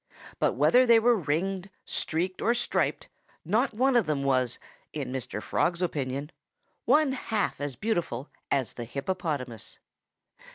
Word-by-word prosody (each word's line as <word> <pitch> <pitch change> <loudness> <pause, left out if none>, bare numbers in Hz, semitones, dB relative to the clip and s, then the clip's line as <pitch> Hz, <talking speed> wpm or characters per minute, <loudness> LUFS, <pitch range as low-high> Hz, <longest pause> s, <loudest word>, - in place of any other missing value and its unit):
But - - +2
whether 250 +1 +5
they 235 -1 +8
were 240 +1 +4
ringed, 185 +3 -1 0.2
streaked 180 +3 -1
or 235 - +3
striped, 240 - 0 0.4
not 220 - +1
one 260 +3 +3
of 235 -5 +4
them 145 -3 0
was 130 -3 +1 0.4
in 140 -4 -4
Mr. 125 -5 -4
Frog's 175 +1 0
opinion 140 -2 -2 0.5
one 300 -2 +4
half 225 - -2
as 145 -2 -3
beautiful 170 - -2 0.2
as 130 -5 0
the 120 - -6
hippopotamus. 140 - -4
170 Hz, 135 wpm, -28 LUFS, 135-220 Hz, 0.5 s, they